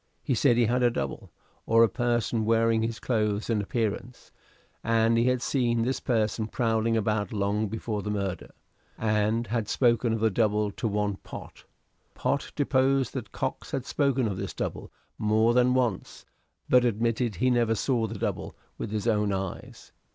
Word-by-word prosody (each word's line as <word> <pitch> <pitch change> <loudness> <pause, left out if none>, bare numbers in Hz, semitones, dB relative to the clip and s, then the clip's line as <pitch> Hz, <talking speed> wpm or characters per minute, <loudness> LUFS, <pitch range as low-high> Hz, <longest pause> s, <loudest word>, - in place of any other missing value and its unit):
He 135 - 0
said 120 +1 +3
he 120 - +4
had 125 +3 +1
a 120 - +5
double 70 - -4 0.4
or 115 0 +6
a - - +6
person 120 -1 0
wearing 115 0 +2
his 115 0 -2
clothes 105 -2 -1
and 110 -2 +1
appearance; 115 +3 -3 0.5
and 115 0 +3
he 115 +1 +3
had 125 -1 +1
seen 120 -4 +1
this 130 +3 -1
person 110 -2 0
prowling 115 -1 0
about 105 -2 0
long 105 +1 0
before 110 0 -3
the 105 - -5
murder, 100 -3 -3 0.5
and 110 +1 +1
had 115 -1 -2
spoken 120 -2 +2
of 115 - 0
the 110 0 +2
double 105 -1 +1
to 115 - -3
one 105 -1 -1
Pott. - - -11 0.5
Pott 140 +2 -1
deposed 135 -2 +2
that - - -6
Cox - - -4
had 130 - -3
spoken 140 -3 +1
of 100 -3 -3
this - - -5
double - - -4 0.3
more 110 +2 +3
than 125 +1 +3
once; 120 -7 -2 0.4
but 125 -1 +5
admitted 115 -1 0
he 125 +9 +2
never 120 -2 +2
saw 115 -1 0
the 110 0 -6
double - - -3 0.2
with - - -4
his 105 0 -3
own 105 -3 +2
eyes. 95 -1 -6
115 Hz, 175 wpm, -27 LUFS, 105-120 Hz, 0.5 s, or